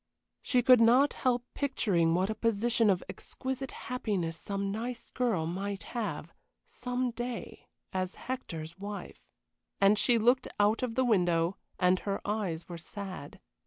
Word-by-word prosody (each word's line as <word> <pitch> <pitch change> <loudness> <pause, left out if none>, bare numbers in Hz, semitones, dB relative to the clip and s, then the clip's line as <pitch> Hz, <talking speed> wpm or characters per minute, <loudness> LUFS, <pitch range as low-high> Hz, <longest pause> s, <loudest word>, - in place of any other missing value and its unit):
She 250 -2 +2
could 250 -1 +7
not 250 +5 +6
help 245 -1 0
picturing 185 - +2
what 190 +4 +1
a - - 0
position 230 +1 +2
of 185 -2 +2
exquisite 265 0 -5
happiness 205 -9 -2
some 200 +3 -3
nice 230 +3 -5
girl 230 -10 +1
might 195 +4 -3
have 190 -9 -3 0.3
some 250 0 -2
day 240 +1 -6 0.3
as 185 -1 -2
Hector's 170 -10 -6
wife. 205 0 -7 0.5
And 200 +1 +5
she 240 -2 +4
looked 245 +3 +3
out 205 +2 +3
of 245 -3 -2
the 260 +1 +3
window, 175 -5 +2 0.2
and 180 0 +3
her 200 -1 -2
eyes 200 -6 -2
were 170 -2 -7
sad. 185 -5 -8
210 Hz, 145 wpm, -31 LUFS, 185-245 Hz, 0.5 s, could